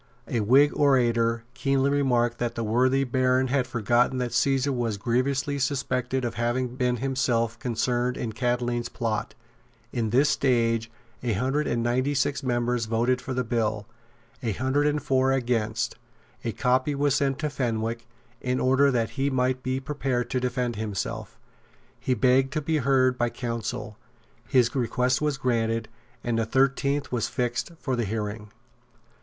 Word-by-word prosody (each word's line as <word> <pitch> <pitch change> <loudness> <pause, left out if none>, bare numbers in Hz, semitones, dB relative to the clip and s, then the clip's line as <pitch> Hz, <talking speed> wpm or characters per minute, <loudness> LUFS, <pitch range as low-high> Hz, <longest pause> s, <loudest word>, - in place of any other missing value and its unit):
A 120 - -1
Whig 135 +7 +5
orator 120 -4 +2
keenly 135 +1 +1
remarked 120 -4 +1
that 120 -1 -2
the 115 - -2
worthy 130 +5 +2
Baron 130 0 +1
had 130 -1 +1
forgotten 120 +1 +1
that 125 -1 -2
Caesar 135 0 +2
was 120 -5 -1
grievously 130 +5 0
suspected 130 -2 -1
of 120 - -2
having 120 +2 -1
been 125 -1 0
himself 120 -3 0
concerned 125 0 -1
in 115 - -3
Catiline's 120 0 -1
plot. 110 -2 -3 0.6
In 115 -3 -1
this 130 +6 +4
stage 115 -5 +1 0.3
a 120 -3 0
hundred 135 +8 0
and 120 -1 0
ninety 130 +4 +1
six 140 +1 0
members 120 -2 0
voted 120 +3 +1
for 130 +1 -4
the 125 - 0
bill, 110 -3 -1 0.6
a 115 -4 -1
hundred 130 +6 +1
and 150 -1 0
four 130 -2 +2
against 115 -4 0
it. - - -28 0.5
A 115 - 0
copy 130 +3 +1
was 140 0 +2
sent 135 -2 +1
to 150 0 -2
Fenwick, 115 -2 -2 0.3
in 125 0 -1
order 135 +2 +4
that 115 -4 0
he 140 0 0
might 130 -1 0
be 130 +1 -1
prepared 130 -3 -2
to 130 - +1
defend 125 -2 -2
himself. 105 -3 -4 0.6
He 130 - 0
begged 130 +1 +3
to 155 - -1
be 155 +2 0
heard 130 -2 +2
by 120 - +2
counsel; 115 -3 -5 0.5
his 120 -2 +3
request 125 +1 +1
was 150 -2 0
granted; 115 -3 0 0.3
and 115 -1 0
the 115 - +1
thirteenth 135 +3 +1
was 120 -2 0
fixed 120 +6 -2
for 130 -3 -1
the 120 -2 -1
hearing. 105 0 -4
125 Hz, 160 wpm, -26 LUFS, 115-135 Hz, 0.6 s, Whig